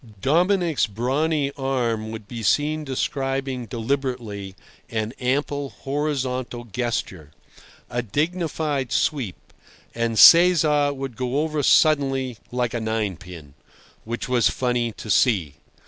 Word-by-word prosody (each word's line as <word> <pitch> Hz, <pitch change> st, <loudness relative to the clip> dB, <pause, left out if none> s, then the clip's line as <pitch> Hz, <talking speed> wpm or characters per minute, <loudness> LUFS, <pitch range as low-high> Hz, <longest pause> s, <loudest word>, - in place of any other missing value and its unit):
Dominic's 170 Hz, -, +2 dB
brawny 140 Hz, +7 st, 0 dB
arm 125 Hz, -6 st, -2 dB
would 110 Hz, -2 st, -8 dB
be 115 Hz, +1 st, -6 dB
seen 150 Hz, +8 st, +1 dB
describing 135 Hz, -2 st, -2 dB
deliberately 115 Hz, -5 st, -3 dB, 0.3 s
an 110 Hz, 0 st, -3 dB
ample 140 Hz, +2 st, -1 dB
horizontal 130 Hz, -4 st, -3 dB
gesture, 110 Hz, -, -4 dB, 0.6 s
a 120 Hz, -, -2 dB
dignified 150 Hz, -, -2 dB
sweep, 130 Hz, -, -2 dB, 0.4 s
and 115 Hz, -1 st, -1 dB
Cesar 155 Hz, -, +7 dB
would 135 Hz, -3 st, -6 dB
go 130 Hz, +4 st, -1 dB
over 155 Hz, -1 st, -1 dB
suddenly 135 Hz, -5 st, +3 dB
like 125 Hz, -1 st, -1 dB
a 120 Hz, -, -2 dB
ninepin—which 95 Hz, -1 st, -6 dB
was 125 Hz, -2 st, +3 dB
funny 120 Hz, -2 st, -1 dB
to 110 Hz, -, -6 dB
see. 90 Hz, -, +2 dB
130 Hz, 105 wpm, -23 LUFS, 115-145 Hz, 0.6 s, Cesar